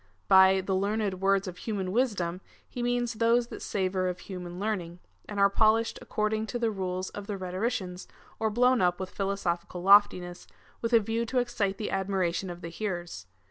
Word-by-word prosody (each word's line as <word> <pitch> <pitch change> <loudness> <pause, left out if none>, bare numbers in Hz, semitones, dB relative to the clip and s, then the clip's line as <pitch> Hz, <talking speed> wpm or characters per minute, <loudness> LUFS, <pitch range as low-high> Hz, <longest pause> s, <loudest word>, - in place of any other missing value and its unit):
By 190 0 +6
the 190 +1 -2
learned 200 -1 -1
words 195 0 +2
of 180 -1 -6
human 200 -4 -3
wisdom^ 190 -6 0 0.3
he 245 - -6
means 240 0 0
those 235 +2 +2
tliat - - -8
savour 185 -2 -1
of 180 -1 -4
human 180 -2 -7
learning, 185 -5 -3 0.3
and 205 -1 -4
are 200 - +7
polished 220 +3 +2
according 215 +1 -1
to 240 - -3
the 230 -2 0
rules 185 -2 -3
of 205 -1 -8
the 205 -2 -3
rhetoricians, 185 0 -3 0.3
or 220 - +1
blown 250 +3 +3
up 180 -1 +2
with 190 -1 -5
philosophical 180 -3 -2
loftiness, 185 -3 +4 0.3
with 230 +1 -2
a 230 - +8
view 225 +2 -1
to 255 - -2
excite 240 -6 0
the 215 - -4
admiration 190 -2 -1
of 175 0 -8
the 165 - -6
hear 180 0 -3
ers. 90 - -10
195 Hz, 185 wpm, -28 LUFS, 185-220 Hz, 0.3 s, a